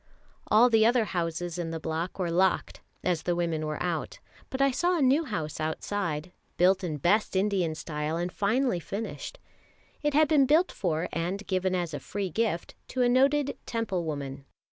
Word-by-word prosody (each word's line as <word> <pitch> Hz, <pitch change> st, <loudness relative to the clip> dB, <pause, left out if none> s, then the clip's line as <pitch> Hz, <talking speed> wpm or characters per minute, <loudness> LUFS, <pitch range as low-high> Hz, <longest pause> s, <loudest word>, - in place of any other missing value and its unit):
All 225 Hz, +4 st, +6 dB
the 220 Hz, -1 st, +5 dB
other 235 Hz, 0 st, +4 dB
houses 175 Hz, -1 st, -3 dB
in 170 Hz, -2 st, -2 dB
the 165 Hz, 0 st, -4 dB
block 160 Hz, +3 st, -3 dB
were 180 Hz, -3 st, -1 dB
locked 185 Hz, +2 st, +1 dB, 0.2 s
as 175 Hz, -3 st, +1 dB
the 175 Hz, +2 st, 0 dB
women 165 Hz, -3 st, -1 dB
were 150 Hz, -1 st, -3 dB
out; 170 Hz, -3 st, -2 dB, 0.3 s
but 260 Hz, -, -4 dB
I 275 Hz, 0 st, +4 dB
saw 350 Hz, +7 st, +1 dB
a -, -, 0 dB
new 280 Hz, +5 st, +4 dB
house 160 Hz, -, -4 dB
outside, 160 Hz, +1 st, -2 dB, 0.3 s
built 185 Hz, +2 st, +4 dB
in 160 Hz, -4 st, -2 dB
best 195 Hz, +8 st, +2 dB
Indian 190 Hz, -5 st, +1 dB
style, 155 Hz, 0 st, -3 dB
and 175 Hz, +1 st, -2 dB
finely 215 Hz, +1 st, +1 dB
finished. 215 Hz, -, -5 dB, 0.6 s
It 295 Hz, -1 st, 0 dB
had 310 Hz, 0 st, +5 dB
been 285 Hz, -3 st, +4 dB
built 325 Hz, +6 st, +4 dB
for, 165 Hz, -3 st, -1 dB
and 180 Hz, +5 st, -2 dB
given 185 Hz, -1 st, 0 dB
as 175 Hz, -3 st, -2 dB
a 145 Hz, -, -3 dB
free 195 Hz, +5 st, -4 dB
gift, 215 Hz, -4 st, -1 dB
to 255 Hz, -, 0 dB
a 245 Hz, -, +4 dB
noted 275 Hz, +3 st, +3 dB
Temple 225 Hz, -7 st, -1 dB
woman. 140 Hz, -3 st, -5 dB
185 Hz, 185 wpm, -28 LUFS, 165-230 Hz, 0.6 s, All